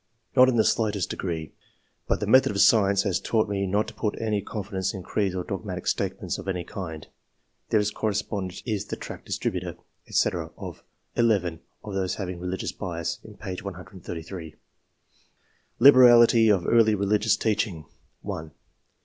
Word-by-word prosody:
" - - -43
Not 130 0 +7
in 125 - +1
the 110 - +4
slightest 105 -5 0
degree; 80 -5 -4 0.5
but - - +1
the - - -2
method 130 -1 +5
of 100 - -3
science 100 0 +5
has 100 -4 0
taught 110 -2 +1
me 100 -1 -1
not 105 +3 +1
to 115 - -8
put 105 -2 -3
any 110 -2 0
confidence 100 -2 -4
in 95 - -7
creeds 95 -2 -1
or 90 - -2
dogmatic 95 -3 -5
statements - - -2
of - - -9
any 90 -3 -2
kind/' 80 -6 -7 0.6
[This 105 -1 +2
corre 110 0 -1
spondent 100 -3 -4
is 105 -4 -2
the - - -4
tract - - -9
distributor, - - -3 0.3
&c., - - +2 0.3
of - - -8 0.3
(11) 100 -8 +1 0.2
of 105 - -7
those 95 -2 -1
having 90 -3 -5
"religious 90 +1 -3
bias'' 85 -4 -4
in - - -13
p. 90 -1 -6
133.] 90 -3 -8 1.2
Liberality 120 -4 +7
of 95 -4 +3
early 110 -2 +4
religious 105 +2 +2
teaching. 105 -8 -1 0.2
— - - -43
1. 90 -6 -5
100 Hz, 165 wpm, -26 LUFS, 90-110 Hz, 1.2 s, Not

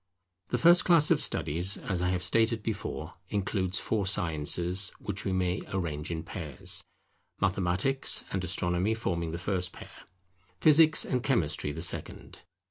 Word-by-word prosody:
The - - -1
first 175 +2 +6
class 165 -4 +6
of - - +4
studies, 90 +6 -1
as 95 -3 -3
I 90 - 0
have 90 -1 -1
stated 110 +4 +1
before, 105 -6 -5 0.2
includes 100 -1 -1
four 105 -4 -1
sciences 90 +1 +1
which 100 -1 -5
we 95 - -1
may 90 0 -1
arrange 80 -5 -3
in 80 -1 -4
pairs: 80 -5 -2 0.6
Mathematics 95 +9 +1
and 95 -1 -2
Astronomy 90 +3 -1
forming 85 -7 -3
the 85 - -4
first 90 0 -2
pair; - - -12 0.7
Physics 155 +4 +6
and 125 -2 -1
Chemistry 80 - -1
the 80 +3 -5
second. 90 - -4
95 Hz, 145 wpm, -28 LUFS, 85-110 Hz, 0.7 s, first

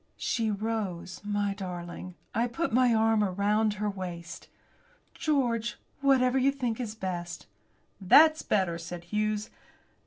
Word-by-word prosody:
She 225 -3 0
rose, 205 -4 -3
my 205 -1 -1
darling. 180 -2 -7 0.2
I 230 +2 +1
put 330 +4 -2
my 250 0 +4
arm 225 -1 +3
about 205 +2 +1
her 210 0 -2
waist. 180 -4 -6 0.7
"George, 240 -7 0 0.2
whatever 265 -2 +3
you 270 +2 +4
think 250 -5 -3
it 225 -3 -5
best." 175 -2 -4 0.6
"That's 310 - +6
better," 185 -5 0
said 170 +1 -7
Hughes. 210 +3 -2
210 Hz, 125 wpm, -29 LUFS, 185-235 Hz, 0.7 s, That's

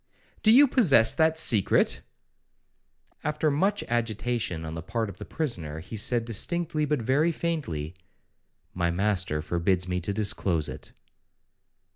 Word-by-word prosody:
'Do 215 - +3
you 280 +5 +7
possess 145 - +5
that 160 0 +2
secret?'—After 150 - -1
much 195 +8 0
agitation 115 -6 -2
on 80 - -6
the 80 - -5
part 110 +4 -3
of 95 - -11
the - - -7
prisoner, 85 - -3
he 90 +7 -9
said 115 +2 0
distinctly, 155 - -1
but 150 -5 -1
very 145 +8 +2
faintly, 140 - -3 0.8
'My 85 -1 0
master 90 -4 0
forbids 90 +2 0
me 90 0 -2
to 95 - -3
disclose 95 -6 -1
it.' - - -8
115 Hz, 130 wpm, -26 LUFS, -, 0.8 s, you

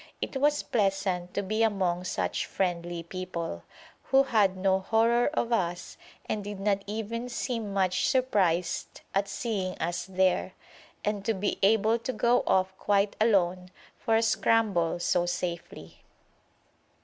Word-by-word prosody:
It - - -4
was 295 +2 +2
pleasant 195 -4 -1
to - - 0
be 215 +3 -1
among 185 -5 +1
such 185 - -2
friendly 175 -2 -2
people, 170 - -5 0.4
who 270 0 +4
had 205 -7 +2
no 190 0 +2
horror 230 +4 +2
of 235 0 0
us 175 -4 -2 0.3
and 210 - -2
did 205 -1 -6
not 200 0 0
even 225 +3 -4
seem 235 -3 -3
much 185 -2 +1
surprised 195 -10 0
at 195 +1 +1
seeing 200 -4 -3
us 175 +1 -3
there, 185 -1 +1 0.5
and 205 -1 -1
to 225 - +1
be 200 +2 -2
able 220 +3 +3
to 255 +3 -4
go 240 0 +3
off 190 0 +2
quite 200 0 +1
alone 185 -4 +2 0.3
for 225 - 0
a 225 - +3
scramble 215 -7 +2
so 175 0 +1
safely. 175 -1 -5
195 Hz, 140 wpm, -28 LUFS, 180-225 Hz, 0.5 s, who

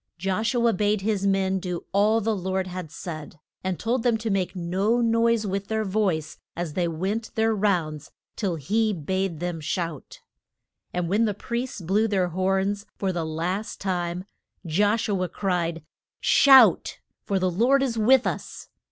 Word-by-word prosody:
Josh 195 +7 -1
u 235 -1 +2
a 230 - +3
bade 210 +1 +1
his 200 -1 0
men 190 -1 +1
do 180 -2 -5
all 210 +3 +3
the 220 +1 0
Lord 190 0 -2
had 180 -3 -6
said; 155 -2 -8 0.2
and 185 -2 -1
told 240 +3 0
them 235 -1 +2
to 220 0 -3
make 195 -1 -1
no 190 +7 0
noise 230 -1 +2
with 200 0 -3
their 220 0 -1
voice 185 -7 -1 0.2
as 170 -3 -4
they 175 0 0
went 190 +7 -2
their 225 0 +2
rounds 175 -8 -1 0.3
till 195 -6 -1
he 215 +9 0
bade 185 0 -2
them 175 -2 -3
shout. 160 -1 -4 0.7
And 180 -1 -2
when 210 +6 +2
the 210 -2 -1
priests 235 0 -4
blew 200 +6 +1
their 190 -4 +1
horns 195 +3 0
for 190 -2 -1
the 170 -2 -2
last 175 +7 -3
time, 180 -2 -2 0.4
Josh 205 +7 +1
u 200 -3 0
a 180 - -1
cried, 170 -4 -2 0.4
Shout! 270 -2 +6 0.3
for 200 - -1
the 185 -1 +1
Lord 250 +9 +3
is 250 -4 -1
with 245 +4 +4
us! - - -5
195 Hz, 170 wpm, -25 LUFS, 175-220 Hz, 0.7 s, Shout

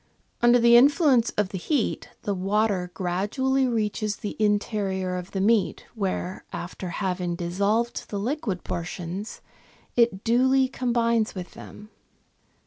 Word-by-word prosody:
Under 240 +1 +6
the 235 0 +6
influence 265 -2 +5
of 210 -2 +1
the 190 - -5
heat, 270 - -1
the 205 - -1
water 195 -1 0
gradually 235 +9 0
reaches 215 -2 -1
the 205 - -6
interior 205 -3 0
of 180 +1 -5
the 195 - -3
meat, 210 +1 +1
where, 190 -4 -3
after 180 +1 -6
having 180 -1 -2
dissolved 200 +7 -1
the 205 - -3
liquid 215 -4 -2
portions, 175 +4 -5 0.5
it 230 -5 +2
duly 260 +3 +3
com 255 -1 -2
bines 230 -2 +1
with 180 -1 -6
them. 210 +1 -12
210 Hz, 135 wpm, -25 LUFS, 185-235 Hz, 0.5 s, Under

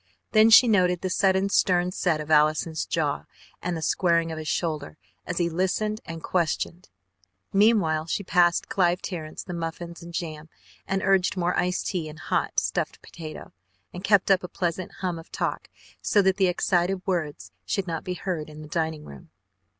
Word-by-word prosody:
Then 215 0 +6
she 225 +2 +9
noted 180 -5 +3
the 185 - -2
sudden 190 +1 +2
stern 180 -2 +2
set 175 -4 0
of 155 +1 -5
Allison's 155 +1 +2
jaw 150 -4 -1 0.4
and 180 -1 -2
the 160 - -5
squaring 170 0 +2
of 155 -1 -5
shoulder 155 -4 -2 0.3
as 175 - -3
he 175 - +2
listened 190 +5 -1
and 165 -1 -7
questioned. 175 +1 -1 0.6
Meanwhile 195 -7 +3
she 200 - -2
passed 175 -1 +3
Clive 180 -1 +1
Terrence 160 -5 -5
the 180 - -7
muffins 170 0 -5
and 170 0 -9
jam, 160 -2 -5 0.4
and 195 0 -1
urged 190 0 +2
more 175 0 +1
iced 180 0 0
tea 165 -4 -2
and 155 - -10
a - - -12
hot, - - 0
stuffed - - -3
potato, 155 -2 -9 0.4
and 180 - -7
kept 200 -1 +4
up 190 -2 +4
a - - -4
pleasant 175 0 -3
hum 180 -3 -2
of 165 - -14
talk - - -3 0.3
so 205 - +3
that 190 0 +2
the 190 -2 +4
excited 180 +1 +1
words 150 - -2
should 190 - -1
not 165 -3 -4
be 180 - -3
heard 170 -5 -4
in 155 0 -10
the - - -10
dining 160 -1 -2
room. 70 -1 -12
175 Hz, 180 wpm, -26 LUFS, 160-185 Hz, 0.6 s, she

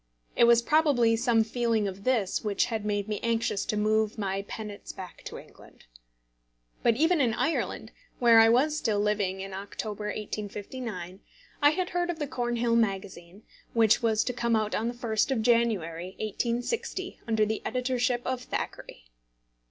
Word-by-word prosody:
It 235 - +6
was 235 0 +5
probably 280 -6 +3
some 230 -1 +3
feeling 225 -2 0
of 195 +1 -7
this 230 -7 +1
which 210 -2 +1
had 220 -2 -2
made 205 -1 -1
me 210 -1 -2
anxious 230 -3 0
to 215 - -1
move 215 +1 +1
my 195 -2 -2
penates 210 -2 -7
back 185 -2 -10
to - - -6
England. - - -16 1.0
But 235 - +3
even 320 +4 +3
in 235 -4 +2
Ireland, 325 - -1 0.3
where 235 -2 +6
I 225 0 +7
was 275 +6 +3
still 220 -9 0
living 205 -2 0
in 195 0 -7
October, 205 +2 -5
1859, 210 -2 -5 0.4
I 290 - +7
had 355 +4 -2
heard 350 0 0
of 345 - -2
the 300 - -2
Cornhill 240 -3 0
Magazine, 195 -3 -2 0.3
which 220 -2 +4
was 220 -2 +2
to 250 - -2
come 235 -1 +1
out 215 -1 0
on 225 - 0
the 240 - -3
1st 230 -1 0
of 245 -5 0
January, 190 -7 +1
1860, 245 - -3
under 220 -1 +2
the 220 +1 -2
editorship 250 -1 0
of 255 -1 -2
Thackeray. 155 - -6
225 Hz, 165 wpm, -28 LUFS, 210-245 Hz, 1.0 s, I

